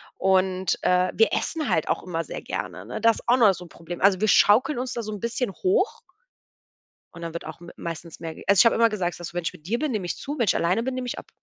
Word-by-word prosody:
Und, 190 -1 +1
äh, 180 0 +3
wir 225 - +3
essen 315 -4 -1
halt 160 - +1
auch - - 0
immer 165 -2 -3
sehr - - -6
gerne, 90 +1 -5
ne? 125 - -5
Das 230 -1 +2
auch 245 +2 +5
noch 215 -5 +6
so 180 -1 -9
'n - - -15
Problem. 170 +1 -9
Also, 190 -1 +4
wir 215 - +3
schaukeln 240 +8 +5
uns 255 0 -3
da 235 - -3
so 215 - -5
'n 210 - -6
bisschen 235 -2 -2
hoch 420 - 0 1.1
und 170 - -11
dann 165 -1 -5
wird 170 - -6
auch 160 - -8
m 170 - -10
meistens 165 0 -7
mehr 165 -1 -5 0.2
also 200 -2 +5
ich - - +8
habe 230 - +5
immer 230 0 +4
gesagt, 180 -6 -3
dass: 175 0 -7
„Wenn 175 -1 -3
ich - - -2
mit 155 +3 -15
dir 235 +4 0
bin, 305 -3 -1
nehme 210 -6 -2
ich - - -3
zu, 290 +2 -5
wenn 235 - +2
ich 195 - +2
alleine 185 +7 +1
bin, 260 +1 -2
nehme 255 -1 -4
ich - - -4
ab.“ - - -14
190 Hz, 280 wpm, -25 LUFS, 170-235 Hz, 1.1 s, ich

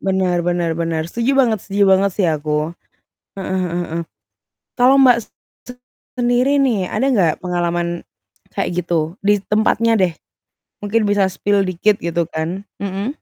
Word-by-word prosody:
Bener 185 -2 0
bener 175 -1 0
bener. 165 -1 -1
Setuju 235 +3 0
banget 240 -5 +3
setuju 200 0 0
banget 195 +1 +4
sih 190 -4 +1
aku. 150 +1 -1 0.7
Heeh 190 -1 -3
heeh 175 -2 -2 0.2
heeh. 170 +1 -2 0.8
Kalau 250 +2 +6
Mbak 250 -3 +6 1.0
sendiri 245 +4 +2
nih 230 -10 +1
ada 250 +6 0
nggak 175 -8 +3
pengalaman 175 -1 -2 0.5
kayak 180 0 -2
gitu? 165 -1 -1
Di 205 +1 +3
tempatnya 220 +2 +2
deh, 185 -5 +2 0.7
mungkin 210 +2 0
bisa 205 -2 +2
spill 200 +2 0
dikit 200 +4 +1
gitu 170 0 -1
kan. 170 +5 -3 0.2
Mhm. 200 +2 -3
190 Hz, 140 wpm, -19 LUFS, 170-215 Hz, 1.0 s, Kalau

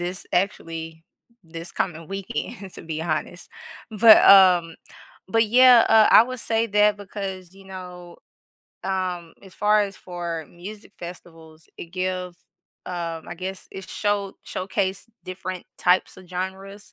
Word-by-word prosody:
this 180 +1 -4
actually 165 -4 -3 0.4
this 165 0 -8
coming 165 -3 -3
weekend, 195 0 -6
to - - -10
be 160 -1 -5
honest, 160 +2 -4 0.4
but, 220 +1 +8
um, 180 -4 +7 0.5
but, 225 +2 +2
yeah, 250 +1 +7
uh, 220 -1 +6
I - - +9
would 255 0 -6
say 225 0 0
that 210 -1 +3
because, 190 -3 -7
you 195 0 -16
know, 180 -2 -10 0.7
um, 185 -3 -3
as 190 -2 -15
far 210 0 +3
as 200 -1 -3
for 170 -3 -6
music 205 +5 -11
festivals, 165 -2 -12
it - - -7
give, 185 0 -4 0.5
um, 170 -2 -5
I - - -6
guess, 185 +2 -6
it 190 - -9
show 205 -2 -1
showcase 190 +1 -3 0.2
different 185 0 -6
types 180 +1 +2
of 185 -1 -15
genres 190 +2 -6
185 Hz, 140 wpm, -23 LUFS, 175-200 Hz, 0.7 s, I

